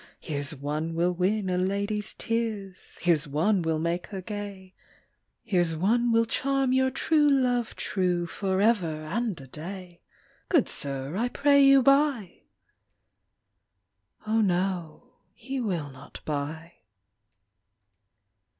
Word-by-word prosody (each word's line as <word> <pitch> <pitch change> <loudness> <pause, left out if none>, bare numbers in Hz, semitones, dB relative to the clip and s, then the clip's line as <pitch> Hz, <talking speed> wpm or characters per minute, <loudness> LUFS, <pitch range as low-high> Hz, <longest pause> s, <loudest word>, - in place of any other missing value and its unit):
Here 150 -4 -4
s 145 +2 -3
one 150 +4 -3
will 175 +2 +1
win 190 +3 0
a 180 -1 0
lady 200 +3 -1
s 210 - -5
tears, 220 -5 -3
Here 175 -1 +5
s 150 -1 0
one 175 +8 +1
will 160 -1 0
make 170 +2 -2
her 195 - -6
gay, 200 -1 -7 0.7
Here 190 -6 +1
s 165 -2 -1
one 230 +8 +2
will 230 0 +4
charm 270 +2 0
your 260 0 +3
true 295 +3 +2
love 250 -4 +1
true 180 -3 -1
Forever 190 -3 0
and 210 +2 -2
a 135 - -10
day; 175 +5 -8 0.5
Good 325 -9 +3
sir, 140 +2 -2
I 235 +5 0
pray 280 +2 +4
you 275 -1 +6
buy! 275 - +2 1.8
O/z, 220 -1 +2
wo, 180 +4 -2 0.2
he 265 +3 -5
will 170 - -2
not 135 +2 -12
buy. 155 +3 -4
190 Hz, 130 wpm, -27 LUFS, 165-230 Hz, 1.8 s, you